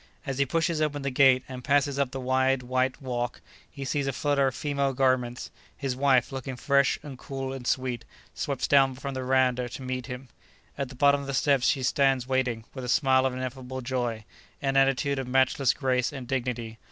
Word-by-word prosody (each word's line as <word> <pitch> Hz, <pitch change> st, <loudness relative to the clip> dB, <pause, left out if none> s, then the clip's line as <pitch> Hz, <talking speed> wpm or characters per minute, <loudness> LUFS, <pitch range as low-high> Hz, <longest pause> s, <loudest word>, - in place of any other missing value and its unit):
As 135 Hz, -2 st, -3 dB
he 140 Hz, -, +2 dB
pushes 165 Hz, +2 st, 0 dB
open 145 Hz, -2 st, -1 dB
the 140 Hz, -, -1 dB
gate 130 Hz, -1 st, +5 dB
and 125 Hz, -1 st, -8 dB
passes 140 Hz, 0 st, +2 dB
up 140 Hz, -2 st, +1 dB
the 135 Hz, -, -6 dB
wide 130 Hz, 0 st, +1 dB
white 130 Hz, +1 st, 0 dB
walk, 125 Hz, -2 st, -3 dB, 0.3 s
he 140 Hz, -, -7 dB
sees 140 Hz, +1 st, -1 dB
a -, -, +1 dB
flutter 140 Hz, 0 st, +1 dB
of 130 Hz, -, -2 dB
female 140 Hz, -2 st, -1 dB
garments; 125 Hz, -2 st, 0 dB, 0.3 s
his 135 Hz, -3 st, -2 dB
wife, 130 Hz, -2 st, +3 dB
looking 135 Hz, -1 st, -5 dB
fresh 140 Hz, +1 st, +2 dB
and 135 Hz, -4 st, -9 dB
cool 135 Hz, -1 st, -5 dB
and 130 Hz, -3 st, -7 dB
sweet, 130 Hz, -2 st, -1 dB, 0.3 s
steps -, -, -2 dB
down 135 Hz, -2 st, +4 dB
from 140 Hz, +1 st, -5 dB
the 130 Hz, -, -4 dB
veranda 125 Hz, -1 st, +2 dB
to 130 Hz, -, -8 dB
meet 130 Hz, -1 st, -4 dB
him. 125 Hz, 0 st, -7 dB, 0.5 s
At 135 Hz, -2 st, -3 dB
the 130 Hz, -, -11 dB
bottom 140 Hz, +1 st, +4 dB
of 140 Hz, -, -8 dB
the 140 Hz, -, -2 dB
steps 135 Hz, -2 st, +3 dB
she 135 Hz, -, +1 dB
stands 135 Hz, -1 st, +2 dB
waiting, 125 Hz, -4 st, 0 dB
with 130 Hz, -, -6 dB
a 125 Hz, -, -4 dB
smile 130 Hz, 0 st, +4 dB
of 130 Hz, -, -3 dB
ineffable 130 Hz, 0 st, -5 dB
joy, 120 Hz, -3 st, -2 dB, 0.3 s
an 135 Hz, -1 st, -1 dB
attitude 135 Hz, +1 st, +2 dB
of 130 Hz, -, -4 dB
matchless 130 Hz, 0 st, +3 dB
grace 125 Hz, -2 st, 0 dB
and 130 Hz, -3 st, -7 dB
dignity. 120 Hz, -3 st, -3 dB
130 Hz, 205 wpm, -27 LUFS, 125-140 Hz, 0.5 s, gate